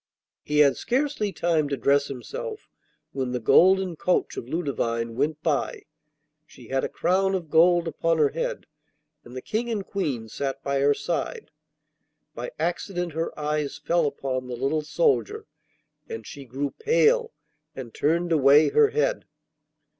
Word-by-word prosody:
He 150 - -2
had 140 -2 +4
scarcely 255 -5 -1
time 165 -4 0
to 140 - -2
dress 140 +4 +2
himself 435 - -7 0.4
when 130 -2 -3
the 125 - -1
golden 185 +9 +4
coach 180 +3 0
of 120 - -7
Ludovine 115 -8 -2
went 150 +4 -1
by. 150 -4 -1 0.6
She 120 -3 -15
had 135 0 0
a - - -1
crown 190 +1 +1
of 170 -5 -5
gold 170 +1 +4
upon 165 0 0
her 150 -2 +4
head, - - -4 0.6
and 120 - -13
the 130 - -6
King 235 +3 -2
and 210 -4 -2
Queen 140 - -3
sat 135 +4 -4
by 140 -1 0
her 140 +1 +3
side. 460 -3 -4 0.8
By - - -5
accident 175 -1 -2
her 165 +1 -3
eyes 150 -1 -2
fell 170 -3 +1
upon 130 -2 -3
the 125 - -5
little 135 +5 0
soldier, 435 - 0 0.6
and 455 - -6
she 140 -1 -9
grew 135 +3 -3
pale 470 0 +3 0.4
and 120 -4 -8
turned 170 +3 0
away 145 0 +6
her 445 -1 +4
head. - - 0
155 Hz, 155 wpm, -25 LUFS, 140-190 Hz, 0.8 s, away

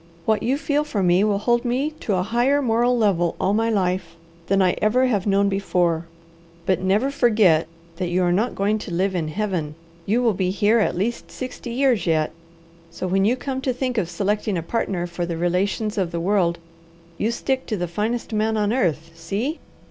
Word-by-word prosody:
What 215 -2 +2
you 260 +4 +1
feel 295 0 0
for 225 -10 -2
me 180 +2 +4
will 210 -1 +2
hold 240 +3 +1
me 260 +5 0
to 205 - -1
a 180 - +1
higher 240 +7 +2
moral 245 -1 +2
level 180 -7 +2
all 195 - +1
my 225 +2 +1
life 185 -5 -1 0.3
than 195 0 +2
I 185 -2 +4
ever 245 +5 +3
have 210 -6 0
known 200 0 +3
before; 175 -4 0 0.6
but 185 0 +1
never 205 +9 +1
forget 210 - +3 0.3
that 180 0 -2
you 180 +1 +1
are 175 - +2
not 215 +7 0
going 210 +2 +1
to 205 - -7
live 190 +3 0
in 170 -4 -1
Heaven. 165 -4 -2 0.3
You 230 +5 +2
will 230 -3 +3
be 185 -1 -1
here 210 +4 +3
at 210 - 0
least 225 +6 -2
sixty 255 -1 -7
years 240 -6 +1
yet, 155 -2 +1 0.6
so 170 +2 -6
when 195 +2 +2
you 235 +4 +3
come 265 +1 -4
to 260 -1 0
think 250 -2 -1
of 175 -5 -2
selecting 205 +2 -1
a 165 - -3
partner 180 -2 -2
for 175 0 -4
the 170 -1 -3
relations 195 +5 0
of 180 -3 -1
the 170 - -2
world, 175 -2 +1 0.6
you 215 - +1
stick 260 +3 -2
to 215 - -2
the 175 -1 -2
finest 220 +7 -2
man 215 +1 +1
on 210 +1 +1
earth; 165 - 0
see?" 200 - -3
205 Hz, 205 wpm, -22 LUFS, 180-235 Hz, 0.6 s, me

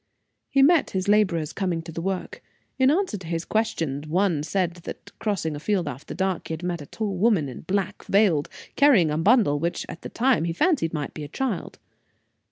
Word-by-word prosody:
He 275 -1 +4
met 325 +2 +5
his 185 - -2
laborers 185 -7 +2
coming 180 -4 -2
to 165 - -8
the 165 - -5
work. 190 +1 -4 0.4
In 260 0 +5
answer 320 - +1
to 175 - -10
his 165 0 -2
questions, 160 -10 -1
one 175 -1 +1
said 175 +2 -1
that, 170 - -9
crossing 185 -8 -1
a - - -5
field 180 +1 0
after 130 +2 -6
dark, 190 -1 -1
he - - -4
had 160 - -11
met 175 -2 -2
a 145 - -10
tall 210 -3 -3
woman, 195 -7 +3
in 130 - -8
black, 190 +1 -2
veiled, 195 -8 +3 0.3
carrying 235 - +5
a 150 - -1
bundle 195 - +4
which, 170 +3 -2
at 165 - -9
the - - -7
time, 245 -8 +2
he 170 - -1
fancied 215 - +1
might 150 -3 -4
be 155 - -6
a - - -6
child. 220 - -3
180 Hz, 205 wpm, -25 LUFS, 160-215 Hz, 0.4 s, met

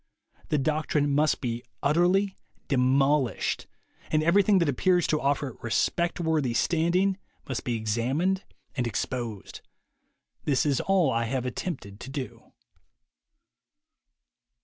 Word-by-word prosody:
The 150 - +2
doctrine 150 0 0
must 150 +1 +2
be 120 -2 -2 0.2
utterly 180 +6 +3 0.3
demolished, 135 -1 +1 0.4
and 155 0 +2
every 170 +5 +5
thing 200 0 +4
that 170 -3 +2
appears 175 +6 +2
to 155 - 0
offer 140 0 0
it 120 - -14
respectworthy 160 +1 0
standing 180 +7 +2 0.3
must 130 - -3
be 120 - -1
examined 130 - 0 0.3
and 125 -2 0
exposed. 115 -2 -4 0.8
This 140 -1 +1
is 140 -3 +1
all 185 -8 +2
I 115 -1 0
have 130 +1 -2
attempted 125 - -5
to 130 - -8
do. 135 -1 -7
145 Hz, 120 wpm, -27 LUFS, 125-170 Hz, 0.8 s, every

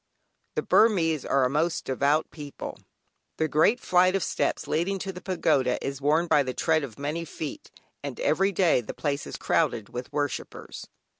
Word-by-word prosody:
The - - 0
Burmese 165 - +3
are 140 - +2
a - - +1
most 160 +3 0
devout 140 +4 +1
people; 145 -3 -8 0.6
the 160 - +1
great 160 +11 +3
flight 185 -1 +3
of 195 - +1
steps - - -1
leading 175 +5 0
to 190 +1 -5
the 180 - -9
Pagoda 135 -9 +1
is 140 0 -4
worn 155 +4 +3
by 150 -3 +4
the 130 -2 -3
tread 160 -2 +2
of 125 -6 -7
many 150 +4 -3
feet, 165 - -7 0.3
and - - -6
every 200 - +2
day 175 -8 +3
the 115 - -8
place 145 -1 -2
is - - -6
crowded 105 - 0
with 125 +1 -6
worshippers. 145 -3 -4
155 Hz, 175 wpm, -26 LUFS, 140-180 Hz, 0.6 s, by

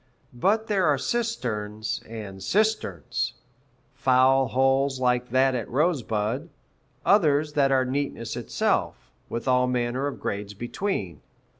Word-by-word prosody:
But 205 - +1
there 200 -5 +1
are 145 -2 +3
cisterns 115 - -2
and 105 -4 -7
cisterns 210 - 0 0.6
foul 130 0 +4
holes 135 +1 +2
like 125 -1 +1
that 130 +2 +3
at 120 -4 -3
Rosebud, 130 -2 0 0.6
others 150 -6 +3
that 140 -2 +3
are 130 -1 +3
neatness 140 +2 -3
itself, - - -1 0.2
with 115 +2 -4
all 125 0 +3
manner 125 +2 -1
of 145 - -5
grades 100 0 -4
between. 110 - -3
130 Hz, 120 wpm, -25 LUFS, 115-145 Hz, 0.6 s, foul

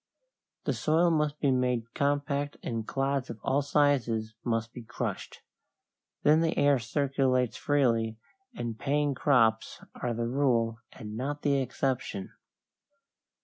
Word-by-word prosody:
The - - 0
soil 165 +3 +2
must 150 -2 0
be 140 - +2
made 125 -3 0
compact 145 0 -1
and 115 -2 -3
clods 135 -1 -1
of 115 -2 -7
all 140 +2 +2
sizes 130 -7 +1
must 115 -1 -1
be 125 - -8
crushed. 115 - -5 0.8
Then 155 +2 +5
the 165 -1 0
air 145 -2 +4
circulates 130 0 0
freely, 115 -6 +1 0.4
and 115 - -4
paying 145 0 +1
crops 115 -5 +2
are 120 -2 -3
the 115 0 -1
rule 120 -4 +1
and 105 -1 -8
not 145 +5 -3
the 140 -1 +3
exception. 130 -5 -2
130 Hz, 130 wpm, -29 LUFS, 115-145 Hz, 0.8 s, Then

